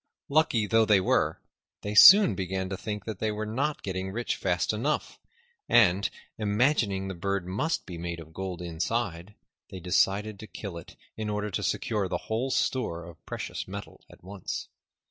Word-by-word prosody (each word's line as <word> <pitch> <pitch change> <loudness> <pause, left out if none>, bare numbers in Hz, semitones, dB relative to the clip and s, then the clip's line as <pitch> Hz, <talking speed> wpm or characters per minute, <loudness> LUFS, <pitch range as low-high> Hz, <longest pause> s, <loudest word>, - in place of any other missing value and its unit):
Lucky 140 -7 +3
though 115 +2 +4
they 105 -2 +5
were, 95 - +1 0.4
they 105 - -3
soon 190 - +9
began 95 0 -3
to 95 - -3
think 105 +1 -5
they 110 0 -2
were 105 0 -3
not 135 +8 -2
getting 95 0 -3
rich 120 +4 -2
fast 90 +1 0
enough, 130 +8 -2 0.5
and, 100 -3 +4 0.3
imagining 105 -2 +1
the 95 - -4
bird 100 +1 -2
must 105 - -1
be 85 -3 -8
made 85 0 -4
of 80 -1 -12
gold 90 -1 -5
inside, 90 +2 -3 0.3
they 95 - -8
decided 100 +4 +1
to 110 - -9
kill 100 -5 -7
it 85 - -10 0.2
in 110 -1 -3
order 105 0 -2
to - - -2
secure 105 -4 -1
the - - -1
whole 120 +5 0
store 110 -10 -1
of 85 -2 -13
precious - - -5
metal 100 +1 -8
at - - -17
once. 95 0 -6
100 Hz, 170 wpm, -28 LUFS, 95-110 Hz, 0.5 s, soon